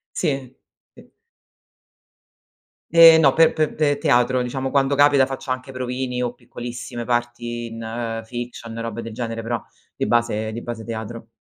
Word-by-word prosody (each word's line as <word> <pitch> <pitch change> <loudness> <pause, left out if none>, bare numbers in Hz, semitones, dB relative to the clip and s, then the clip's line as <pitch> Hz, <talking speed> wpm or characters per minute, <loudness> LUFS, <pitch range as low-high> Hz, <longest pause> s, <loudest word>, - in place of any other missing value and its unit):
Sì. 135 -3 -2 0.4
P - - -17 1.8
Eh 165 -1 +9
no, 145 -4 +5
pe 165 +2 +5
pe 155 -1 +1
pe 150 -2 +2
teatro, 125 -3 +3
diciamo 130 +2 -3
quando 140 0 +2
capita 145 -2 +5
faccio 135 0 -4
anche 130 +1 -6
provini 125 0 -3
o 120 - -3
piccolissime 120 0 -7
parti 120 0 -2
in 115 0 -4
fiction 120 -1 -7
e - - -4
robe 115 0 -4
del 115 - -7
genere, 115 -1 -4
però 120 +1 -3 0.3
di - - -2
base 110 -2 +1
di 115 +2 -5
base 115 -2 -6
teatro. 115 0 -6
120 Hz, 150 wpm, -22 LUFS, 115-135 Hz, 1.8 s, Eh